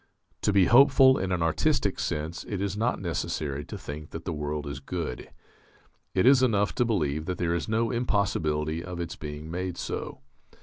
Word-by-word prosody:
To - - +2
be 95 -2 +5
hopeful 130 +2 +6
in 95 0 -2
an 90 -2 +1
artistic 80 -1 +1
sense 80 +3 -3
it 100 - -4
is 100 0 -2
not 115 +4 0
necessary 75 -5 -3
to - - -7
think 75 +1 -8
that 80 - -8
the 90 - -2
world 75 0 -3
is 70 -2 -5
good. 75 -3 -5 0.9
It 95 - +3
is 130 0 +7
enough 105 -5 +2
to - - +4
believe 80 -9 0
that 90 - -2
there 85 -1 0
is 85 +4 -2
no 115 +1 +1
impossibility 85 -9 0
of 90 -1 -6
its 85 - -4
being 75 +1 -7
made 90 0 -3
so.... - - -5
85 Hz, 185 wpm, -27 LUFS, 75-105 Hz, 0.9 s, is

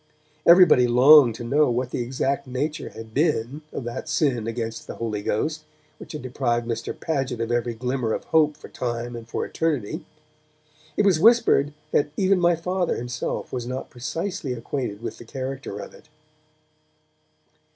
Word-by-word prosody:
Everybody 170 -8 +7
longed 125 0 +7
to 120 - -7
know 145 +5 +3
what 125 +1 -1
the - - -2
exact 130 +3 -1
nature 145 +5 -3
had 110 -1 -11
been 140 -1 0
of - - -5
that 120 0 -5
sin 125 -8 +1
against 115 -1 -4
the - - -6
Holy 110 -3 -3
Ghost 155 +10 -1 0.4
which - - -10
had 150 - -6
deprived 120 -2 -1
Mr. 115 - -4
Paget 135 -7 -2
of 115 0 -2
every 120 -1 0
glimmer 125 0 -2
of - - -3
hope 155 -2 +2
for - - -11
time 120 -1 -4
or 115 - -7
for 115 - -3
eternity. 155 - -2 0.9
It 205 - +3
was 185 -6 +4
whispered 220 -9 +5 0.2
that 145 - +2
even 190 -1 +3
my 175 -1 +4
Father 180 +2 -1
himself 120 0 -4
was 120 -2 -3
not 130 +1 -5
precisely 140 +3 -4
acquainted 115 -3 -4
with - - -5
the - - -9
character 130 -2 -5
of - - -8
it. 150 - -18
130 Hz, 165 wpm, -24 LUFS, 120-155 Hz, 0.9 s, Everybody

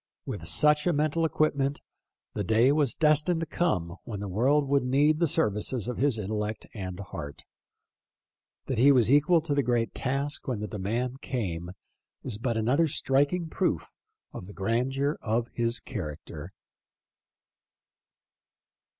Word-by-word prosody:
With - - -5
such 150 +2 +3
a 175 - +3
mental 155 +2 +1
equipment 145 -3 0 0.5
the 105 - -2
day 115 +7 +4
was 145 -4 +1
destined 155 +2 +3
to - - -1
come 95 - -1
when 110 -5 -6
the 100 - -4
world 135 +9 +2
would 140 -1 +2
need 145 +4 +3
the 170 - +3
services 110 -1 0
of 125 - -3
his 140 -4 +2
intel 105 0 -3
lect 105 +1 -4
and 95 -3 -6
heart. 75 -7 -7 1.2
That 130 -4 -2
he 140 +4 +7
was 125 -3 +4
equal 150 +4 +5
to 155 -2 -2
the 140 - +2
great 120 -2 0
task 140 +3 -2
when 125 -5 -2
the 105 - -4
demand 120 +7 -3
came 90 -9 -3 0.5
is 115 -5 -2
but 115 -1 -1
another 130 +9 +2
striking 145 +5 +1
proof - - -1 0.4
of 90 - -8
the 100 - -10
grandeur 130 +8 -1
of 115 +1 0
his 115 0 0
character. 80 - -7
125 Hz, 150 wpm, -28 LUFS, 105-145 Hz, 1.2 s, he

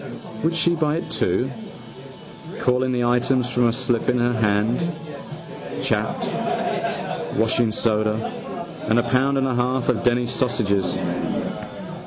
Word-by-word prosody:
Would 165 +1 +2
she 170 0 +3
buy 155 -2 +1
it 165 - -4
too, - - +1 1.1
calling 125 +1 +2
the 125 -1 +1
items 125 +1 +2
from 120 -1 +3
a 115 - +2
slip 120 -2 +1
in 125 - +3
her 120 0 +2
hand? 110 +5 +2 1.0
Chapped: - - 0 1.1
washingsoda. 110 -1 +2 0.7
And 110 +2 +3
a 120 - +4
pound 130 +3 +2
and 135 - +2
a 130 - +1
half 125 +1 +1
of 125 - +1
Denny's 120 0 +2
sausages. 100 -7 +1
120 Hz, 125 wpm, -23 LUFS, 115-130 Hz, 1.1 s, a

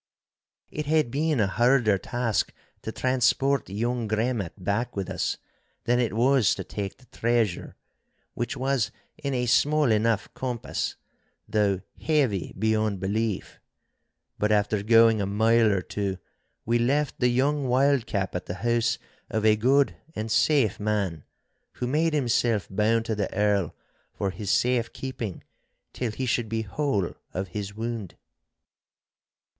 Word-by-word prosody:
It 150 -1 -4
had 155 -5 +2
been 150 0 +1
a 105 - +4
harder 120 0 +3
task 120 -2 -1 0.3
to 110 - -5
transport 130 +2 +1
young 115 +3 -1
Gremmat 110 -4 -1
back 100 +5 -2
with 100 -2 -3
us - - -1 0.5
than 120 +1 +2
it 120 -4 0
was 125 -3 +4
to - - -5
take 100 -2 -5
the 130 - -21
treasure—which 120 +3 -3
was 130 -4 +1 0.3
in 140 -2 -2
a 125 0 0
small 145 +2 +3
enough 110 -1 +2
compass, 125 -3 -3 0.5
though 100 -3 +1 0.2
heavy 135 - +1
beyond 110 -1 +1
belief. 105 +2 -2 0.8
But 105 +1 +1
after 105 0 +2
going 115 0 +5
a 100 - -1
mile 110 +2 +3
or 95 -2 0
two 100 -2 -3 0.5
we 120 +1 +2
left 140 +4 +1
the 125 - +3
young 135 +3 +1
wildcap 125 -7 +1
at 90 - -4
the 90 - -4
house 120 -1 +2 0.3
of 110 -1 -1
a 110 -1 +6
good 135 +6 +3 0.2
and 110 +1 -3
safe 135 -1 +3
man, 100 -7 -1 0.5
who - - -4
made 155 +5 +1
himself 120 -6 +1
bound 110 +3 +2
to 115 - -1
the 105 -2 -2
Earl 105 -3 +1 0.4
for 100 - -2
his 95 +2 -6
safe 120 +1 +2
keeping 125 -8 -5 0.5
till 125 - -2
he 130 +5 -3
should 120 -2 0
be 110 0 -1
whole 105 - -1 0.2
of 95 +1 -3
his 100 +2 -5
wound. 115 -4 -4
115 Hz, 140 wpm, -26 LUFS, 105-125 Hz, 0.8 s, a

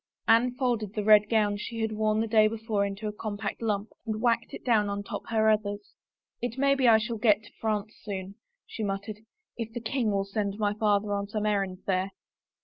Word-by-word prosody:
Anne 245 +2 +4
folded 235 -6 -1
the 210 - -1
red 210 0 +6
gown 210 -2 +2
she 230 +2 -5
had 220 0 0
worn 215 0 +1
the 225 - -1
day 215 -1 +5
before 220 -2 -1
into 200 +2 -3
a - - -2
compact 205 0 -4
lump 210 -1 -1 0.2
and 215 -1 -2
whacked 235 0 +1
it - - -9
down 215 -4 +3
on 200 0 -3
top - - -5
her 220 -1 +2
others. 210 -1 0 0.2
" - - -57
It 245 0 -3
may 275 +1 +4
be 270 -2 +2
I 225 -1 +8
shall 230 0 -3
get 215 -1 +4
to - - -15
France 215 -1 -1
soon," 195 -2 -5 0.3
she - - -7
muttered, 205 +1 -3 0.2
" 430 - -54
if 225 -1 -4
the 240 - -3
king 235 0 -1
will 195 -1 0
send 200 0 -2
my 210 -1 +1
father 205 -1 +1
on 200 0 -2
some 215 0 -2
errand 195 -3 -1
there." 190 0 0
215 Hz, 225 wpm, -28 LUFS, 205-225 Hz, 0.3 s, I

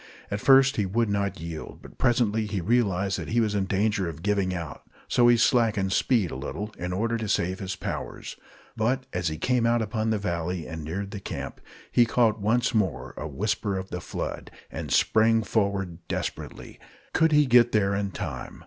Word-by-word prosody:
At 100 0 -2
first 135 +1 +6
he 105 - +1
would 115 +3 +1
not 100 -2 -1
yield; 80 -1 -7
but - - -14
presently 110 -3 +2
he 105 -2 -2
realized 100 -2 +1
that - - -5
he 120 - +1
was 110 -2 +1
in 100 -2 0
danger 100 -1 0
of 80 0 -9
giving 100 -2 +1
out, 85 -5 -5 0.3
so 120 -1 +4
he 120 0 +6
slackened 110 -6 +2
speed 110 - +2
a - - -5
little, 105 +10 -5
in 90 +1 -3
order 115 +5 0
to 110 -1 -4
save 95 +3 0
his 95 -2 -4
powers. - - -5 0.4
But 125 +4 0
as 90 -2 -1
he 80 -1 -2
came 125 +5 +1
out 120 0 +3
upon 110 0 -1
the 110 - +1
valley 90 -3 -3
and 80 -1 -6
neared 95 +6 -4
the 100 - -5
camp, - - -6 0.3
he 120 -1 +4
caught 115 -2 +2
once 115 +4 +1
more 90 - -1
a 75 - -5
whisper 100 +5 -1
of 95 +1 -6
the 90 - -4
flood, - - -5 0.2
and - - -6
sprang 115 0 +4
forward 100 -5 -1
desperately. - - -5 0.3
Could 160 0 +3
he 150 -1 +5
get 120 -2 +5
there 100 -2 +2
in 100 0 -1
time? - - -6
105 Hz, 195 wpm, -26 LUFS, 95-115 Hz, 0.4 s, first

